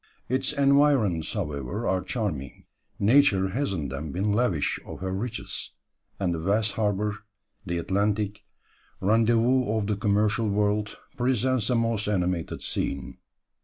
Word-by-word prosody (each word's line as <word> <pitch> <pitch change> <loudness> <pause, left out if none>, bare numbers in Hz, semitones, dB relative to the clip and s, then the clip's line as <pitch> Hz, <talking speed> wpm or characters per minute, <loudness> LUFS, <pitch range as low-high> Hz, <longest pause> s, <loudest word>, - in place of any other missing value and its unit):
Its 130 +3 +1
environs, 140 - +3
however, 90 - -3
are 95 -1 +1
charming; 90 - -4 0.3
nature 100 -4 +4
has 130 +4 -1
in 80 -7 -3
them 70 +3 -5
been 100 +5 0
lavish 105 -9 +1
of - - -9
her 95 0 -3
riches; 115 +4 -4 0.5
and 90 -3 0
the 85 - -3
vast 100 +5 +1
harbour, 105 0 -1 0.5
the 85 0 -1
Atlantic, 100 +3 -1 0.6
rendezvous 115 +4 +3
of 105 - -1
the 105 0 0
commercial 105 +2 +1
world, 105 +1 0 0.2
presents 125 -2 +1
a 125 - +2
most 115 -2 0
animated 90 -4 -1
scene. 70 -1 -3
105 Hz, 130 wpm, -26 LUFS, 95-115 Hz, 0.6 s, nature